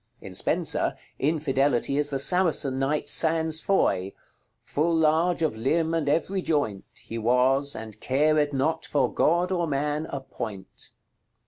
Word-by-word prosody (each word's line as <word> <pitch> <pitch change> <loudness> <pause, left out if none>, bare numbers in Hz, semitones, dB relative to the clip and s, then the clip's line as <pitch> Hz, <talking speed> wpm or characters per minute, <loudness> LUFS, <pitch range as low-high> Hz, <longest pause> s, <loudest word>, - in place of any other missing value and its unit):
In - - -10
Spenser, - - -1 0.2
Infidelity 140 -3 +1
is 145 0 +2
the 140 - -1
Saracen 145 -4 +1
knight 140 +3 -1
Sans 160 -1 +2
Foy, 100 - +1 0.5
"Full 165 +3 0
large 160 +2 +2
of 155 -8 0
limbe 160 +8 0
and 160 -4 0
every 185 +6 0
joint 145 - -1
He 115 - -7
was, 130 +4 +2
and 110 -1 -9
cared 150 +3 +2
not 160 +4 -1
for 135 -5 0
God 175 +3 +2
or 175 -2 0
man 150 +2 -1
a 140 - -4
point." 100 -7 -8
150 Hz, 140 wpm, -26 LUFS, 135-160 Hz, 0.5 s, is